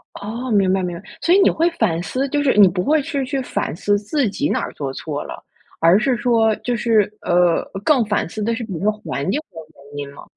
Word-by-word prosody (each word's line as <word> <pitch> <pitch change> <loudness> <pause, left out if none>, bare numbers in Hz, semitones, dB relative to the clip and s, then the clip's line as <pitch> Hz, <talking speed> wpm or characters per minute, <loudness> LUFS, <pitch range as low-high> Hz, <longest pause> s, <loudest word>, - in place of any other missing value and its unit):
哦， 235 +5 -5
明 195 -3 +3
白， 190 - +1
明 175 -1 -3
白。 - - -16 0.2
所 345 - +3
以 - - +6
你 - - +5
会 335 +2 +2
反 170 - 0
思， 265 +9 -2
就 290 +1 0
是 280 -5 +2
你 200 -2 +8
不 180 +1 -1
会 310 0 +2
去 280 -2 -3
去 275 +1 -2
反 250 - -3
思 205 +4 +1
自 230 +2 -1
己 285 +9 -2
哪 - - 0
儿 - - -5
做 140 -2 -4
错 150 0 -5
了？ - - -9 0.4
而 170 +5 +5
是 250 +1 +1
说 225 -3 +2
就 245 - -2
是 225 -1 +3 0.2
呃， 175 -1 +2 0.2
更 270 -6 +4
反 205 -4 -1
思 215 - -7
的 230 +2 0
是 235 - -5
比 215 -4 -6
如 165 - -5
说 210 - +2
环 210 -7 -5
境 285 - 0
的 165 - -16 0.4
原 - - -6
因 140 0 -6
吗？ - - -12
215 Hz, 270 characters per minute, -20 LUFS, 180-260 Hz, 0.4 s, 你